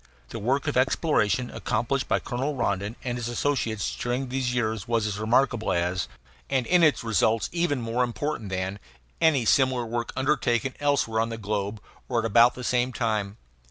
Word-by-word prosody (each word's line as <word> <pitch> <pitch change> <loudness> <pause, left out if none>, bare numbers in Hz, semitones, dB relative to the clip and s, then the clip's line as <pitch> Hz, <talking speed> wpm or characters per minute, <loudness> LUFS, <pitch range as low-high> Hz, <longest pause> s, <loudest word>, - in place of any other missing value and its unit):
The - - -6
work 130 +7 0
of 145 - 0
exploration 125 -3 +1
accomplished 125 +3 -1
by - - +2
Colonel 135 +4 -3
Rondon 100 -3 -1
and 120 -1 -3
his 120 - -3
associates 120 -4 -1
during 125 +2 -2
these 130 -1 -1
years 110 -4 -1
was 115 -2 +1
as 105 -1 -3
remarkable 120 +1 +2
as, 90 +1 0 0.4
and 130 -3 +1
in 180 +5 +4
its 150 -5 +4
results 110 0 +1
even 170 -6 0
more 115 +2 0
important 120 -2 -3
than, 95 +2 -3 0.4
any 145 -7 +4
similar 130 0 +3
work 115 +1 -3
undertaken 130 -2 +1
elsewhere 140 -6 +1
on 115 +1 +1
the 115 - -5
globe 105 0 -3
at - - -24 0.2
or - - 0
about 120 +4 +5
the 125 - -7
same 125 +1 +1
time. 110 -4 -2
120 Hz, 175 wpm, -26 LUFS, 110-130 Hz, 0.4 s, about